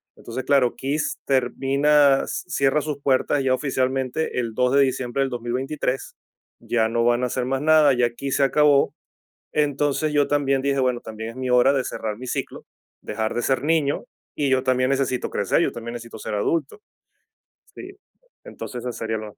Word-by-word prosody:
Entonces, 125 +3 -6
claro, 130 -4 +3
KISS 145 +3 -2
termina 135 +2 +3
s - - -4
cierra 140 +2 +1
sus 150 -1 -4
puertas 140 +1 +1
ya 130 -1 +2
oficialmente 130 +1 -1
el 115 -2 -3
2 125 +2 +1
de 140 - +6
diciembre 130 0 0
del 135 - -2
2023 125 +3 -3 0.5
ya 110 -2 +1
no 115 0 0
van 120 +1 +2
a - - +3
hacer 125 0 -2
más 135 +1 -1
nada, 155 -1 +5
ya 120 -1 +1
KISS 135 +3 -3
se 140 - +3
acabó. 145 0 +3 0.6
Entonces, 145 +1 0
yo 145 -1 +3
también 140 -2 +1
dije: 140 0 0
"Bueno, 125 -2 0
también 110 +1 -7
es 115 - -16
mi 130 0 -4
hora 125 +2 +5
de 135 -2 0
cerrar 110 -3 -4
mi 130 - -8
ciclo, - - -4 0.4
dejar 110 -1 -3
de 120 - -1
ser 130 0 0
niño, 150 -2 +1 0.3
y 145 -2 0
yo 130 -1 +3
también 130 -1 +1
necesito 135 -2 -1
crecer, - - +1
yo - - +1
también 115 0 -7
necesito 115 -1 -8
ser - - -5
adulto, 150 - -1 0.9
¿sí?" 380 +1 -10 0.5
Entonces, 125 - -7
esa 125 - -3
sería 110 -1 -3
lo. 110 -1 -7
130 Hz, 185 wpm, -23 LUFS, 120-140 Hz, 0.9 s, de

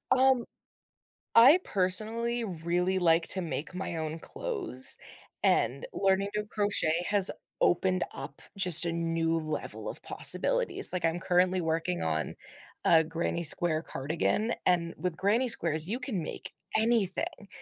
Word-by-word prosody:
Um, 260 -2 0 0.9
I 265 +10 +5
personally 220 +6 -1
really 180 0 -4
like 165 -1 -1
to 190 - +1
make 165 0 -8
my 180 -2 -7
own 160 0 -7
clothes, 390 - +1 0.5
and - - -2
learning 195 +1 -2
to 210 - -4
crochet 180 -5 -2
has 200 -2 +8 0.3
opened 185 +1 -1
up 135 +2 -11 0.2
just 180 -3 +8
a 170 - -4
new 165 0 -4
level 155 -1 -6
of - - -3
possibilities, - - +5
like, 180 -2 -4
I'm 165 +1 -3
currently 180 0 -2
working 165 +2 -5
on 80 -1 -5 0.5
a 160 -1 +2
granny 170 +1 -6
square 160 0 +6
cardigan, 165 - -5
and 170 -2 -2
with 180 -2 -6
granny 220 +7 -2
squares, 160 -6 +2
you 230 - -4
can 255 -9 -5
make - - -8 0.3
anything, 215 -3 -4
180 Hz, 135 wpm, -25 LUFS, 165-210 Hz, 0.9 s, has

